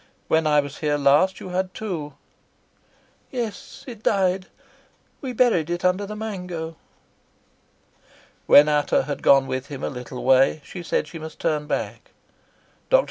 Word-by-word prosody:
"When 160 0 +3
I 150 -1 +4
was 140 0 -9
here 150 -1 +1
last 145 +7 +3
you - - -8
had 185 0 -2
two." 165 -10 -5 1.1
"Yes; 245 +2 -6
it 235 -5 -9
died. 190 -3 +1 0.7
We 265 - -4
buried 225 -10 +2
it 175 +1 -2
under 185 +2 +1
the 210 - -6
mango." 180 -7 -5 1.7
When 145 +1 +8
Ata 150 -2 +2
had 145 +1 -5
gone 135 -1 +5
with 130 0 -4
him 140 -2 -7
a - - -1
little 125 0 -7
way 135 +3 +4
she 180 - -8
said 165 -2 -1
she 165 +2 -9
must 160 0 -9
turn 150 -1 -1
back. - - -4 0.8
Dr. - - +6
160 Hz, 150 wpm, -23 LUFS, 145-190 Hz, 1.7 s, When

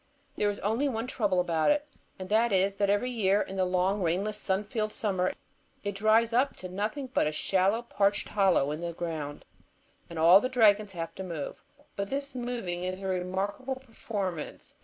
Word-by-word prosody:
There 205 - +1
is 205 - -3
only 230 +8 +1
one 225 -2 -2
trouble 205 -7 0
about 165 -3 +2
it. 295 0 +2 0.3
And 185 - -6
that 225 +2 +3
is, 195 +1 +2
that 200 -1 +2
every 205 +5 +1
year, 205 -4 +2
in 195 - -3
the 190 -1 +2
long, 185 +2 +1
rainless, 195 +5 0
sun 190 +1 0
filled 215 0 -2
summer, 190 -5 0 0.5
it 205 -1 -2
dries 220 +3 +3
up 260 +4 +2
to 185 - -8
nothing 220 +8 -3
but - - +2
a - - 0
shallow, 195 +8 +1
parched 205 -4 +1
hollow 190 -8 +3
in 155 +2 -4
the 170 0 -3
ground, 160 -4 -5 0.6
and 170 - -8
all 170 +5 +7
the 255 - -1
dragons 215 -5 +4
have 165 -2 -5
to 190 - -6
move. 165 -6 -5 0.3
But 200 0 -3
this 280 +1 -3
moving 240 -8 -3
is 185 +1 -4
a - - -2
remarkable 190 +8 -2
performance. 210 - -5
200 Hz, 190 wpm, -29 LUFS, 185-225 Hz, 0.6 s, all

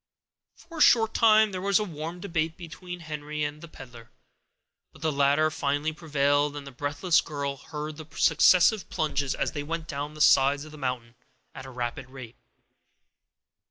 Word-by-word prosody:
For 335 -1 -12
a - - 0
short 225 -5 +5
time 220 -1 +5
there 185 -1 -5
was 200 0 +2
a 215 - 0
warm 165 -1 -7
debate 165 -3 -2
between 175 +1 -9
Henry 150 -1 -5
and 145 +1 -4
the 170 - -9
peddler; 120 -6 -13 0.8
but 145 - -15
the 160 - +1
latter 145 +2 +2
finally 145 +1 -1
prevailed, 145 -2 0
and 145 -1 -7
the 140 - -9
breathless 145 +6 +1
girl 140 -3 -4
heard 150 +2 -7
the 155 -1 -10
successive 190 +3 +4
plunges, 145 -3 -1
as - - -1
they 145 - -4
went 165 +2 -5
down 145 0 -5
the - - -11
sides 140 +1 +4
of 155 - -12
the 155 - -11
mountain 125 -3 -4 0.4
at 130 - -9
a - - -9
rapid 125 +1 -5
rate. 130 -3 -11
150 Hz, 175 wpm, -26 LUFS, 140-165 Hz, 0.8 s, short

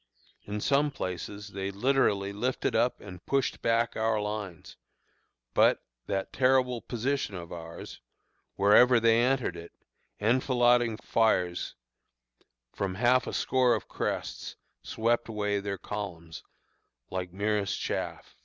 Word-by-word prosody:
In 105 +1 -4
some 145 +4 +2
places 100 -3 -5
they 95 0 -4
literally 100 -3 +1
lifted 125 +6 -1
up 125 - +2
and 90 -3 -10
pushed 135 -1 0
back 115 0 +1
our 110 0 +1
lines; 105 -4 -5 0.8
but, - - +4 0.2
that 95 0 -2
terrible 130 -2 +2
position 125 -2 -2
of 85 -2 -8
ours! 85 -1 -9 0.5
wherever 115 +5 +6
they 115 0 +4
entered 130 0 +1
it, 85 0 -10 0.5
enfilading 120 0 +3
fires 90 -8 0 1.0
from 95 -2 -3
half 125 +4 +3
a - - -4
score 125 -2 +2
of - - -6
crests - - -4 0.3
swept 115 +1 0
away 105 -2 -1
their 100 0 -4
columns 85 -4 -6 0.7
like 90 -1 -3
merest 100 +1 -1
chaff. - - -4
105 Hz, 120 wpm, -29 LUFS, 100-125 Hz, 1.0 s, wherever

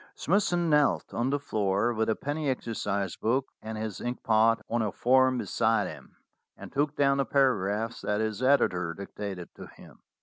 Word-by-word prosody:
Smithson 175 -2 +1
knelt 150 -2 +2
on 120 +3 0
the 145 - +1
floor 105 -4 0
with 110 0 0
a 110 - +2
penny 145 +1 -3
exercise 100 -7 -2
book 130 +4 0 0.2
and 110 0 -6
his 110 -3 -5
inkpot 115 -2 +2
on 120 0 0
a 105 -2 -1
form 130 +1 +3
be - - -3
side 115 0 +1
him, - - -11 0.4
and - - -10
took 145 +2 0
down 140 -1 +3
the 140 - +2
paragraphs 115 -4 +1
that 105 0 -1
his 110 +1 -2
editor 90 -11 +2
dictated 100 -2 -7
to - - -10
him. - - -16
115 Hz, 175 wpm, -28 LUFS, 105-135 Hz, 0.4 s, form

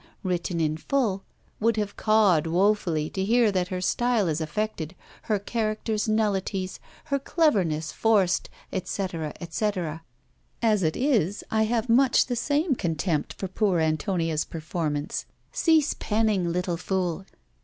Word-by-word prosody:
written 180 -2 -1
in 155 -1 0
full, 210 - 0 0.4
would 225 0 +2
have 210 -1 -2
cawed 205 -8 +3
woefully 175 -3 +2
to 190 - -3
hear 230 +1 +3
that 185 -2 0
her 185 0 -3
style 235 +2 +1
is 160 0 -1
affected, 170 0 -3 0.3
her 210 - +3
characters 215 +1 -2
nullities, 195 -3 0 0.2
her 280 -3 -1
cleverness 190 - +1
forced, 200 -5 +2 0.2
etc., 180 -4 -3
etc. 170 -2 -2 0.6
As 215 -3 +2
it 160 -2 0
is, 220 - +1
I 220 0 +3
have 230 +1 0
much 255 +3 +4
the 245 - -2
same 290 +6 +1
contempt 165 - -1
for 190 - -5
poor 185 -1 +1
Antonia's 160 0 0
performance. 155 -2 -3 0.3
Cease 315 -3 +3
penning, 210 -5 0
little 180 0 -1
fool! 185 0 -2
195 Hz, 135 wpm, -26 LUFS, 170-220 Hz, 0.6 s, much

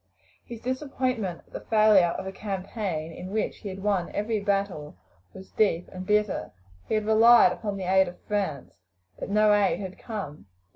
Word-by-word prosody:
His 235 -2 -10
disappointment 255 - -2
at - - -27
the - - -4
failure 215 -6 +4
of 190 - -6
a 190 - -4
campaign 195 -4 -4
in 180 +3 -8
which 215 +2 -2
he 205 - -7
had 190 0 -8
won 200 -4 0
every 215 +1 -1
battle 195 - -2 0.3
was 190 0 -13
deep 180 -5 +1
and 185 0 -8
bitter. 210 - 0 0.4
He - - 0
had 215 -1 0
relied 220 -2 +6
upon 205 +1 -4
the 190 - -5
aid 190 +1 +3
of 175 - -9
France, 190 - -3 0.4
but - - -5
no 210 +1 +4
aid 205 -2 +2
had 190 -2 -7
come. 195 - -7
200 Hz, 180 wpm, -26 LUFS, 185-215 Hz, 0.4 s, relied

